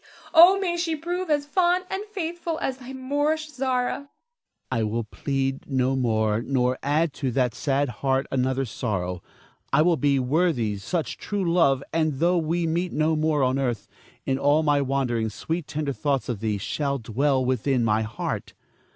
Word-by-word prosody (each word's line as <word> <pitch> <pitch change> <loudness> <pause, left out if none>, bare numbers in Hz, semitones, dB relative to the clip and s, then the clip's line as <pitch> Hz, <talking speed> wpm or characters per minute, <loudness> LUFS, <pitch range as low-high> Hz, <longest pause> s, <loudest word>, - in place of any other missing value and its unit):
Oh, 350 +4 +8
may 350 -3 -1
she 335 -2 0
prove 350 +3 -3
as 290 -1 +2
fond 360 +3 +2
and 385 +2 -3
faithful 345 -5 -4
as 260 - -2
thy 255 0 -9
Moorish 290 +4 -1
Zara. 255 -3 0
Ernest. 280 0 -11 0.6
I 115 - +1
will 110 +2 -1
plead 135 +5 -3
no 130 -1 +1
more, 110 -3 +1
nor 125 0 0
add 150 +2 +1
to 135 -3 -2
that 125 -3 +1
sad 140 +1 0
heart 135 +3 0
another 130 +1 0
sorrow. 95 -6 -3 0.5
I 150 +3 +5
will 170 -1 +3
be 145 -1 +2
worthy 130 - +1
such 165 - -3
true 205 -2 -2
love, 140 -6 +3
and 155 -2 +1
though 175 +5 +2
we 165 +2 0
meet 170 +3 -1
no 155 +1 +1
more 155 -2 +1
on 130 +1 +1
earth, 120 -6 -2 0.4
in 135 0 0
all 145 +3 +3
my 145 -2 +3
wanderings 125 -5 -1
sweet 165 -1 -3
tender 150 -2 -2
thoughts 135 +3 -1
of 115 -5 -2
thee 110 -1 -1
shall 140 +7 -2
dwell 130 +3 0
within 130 0 +1
my 110 0 +2
heart. 110 -1 -4
140 Hz, 175 wpm, -25 LUFS, 125-200 Hz, 0.6 s, Oh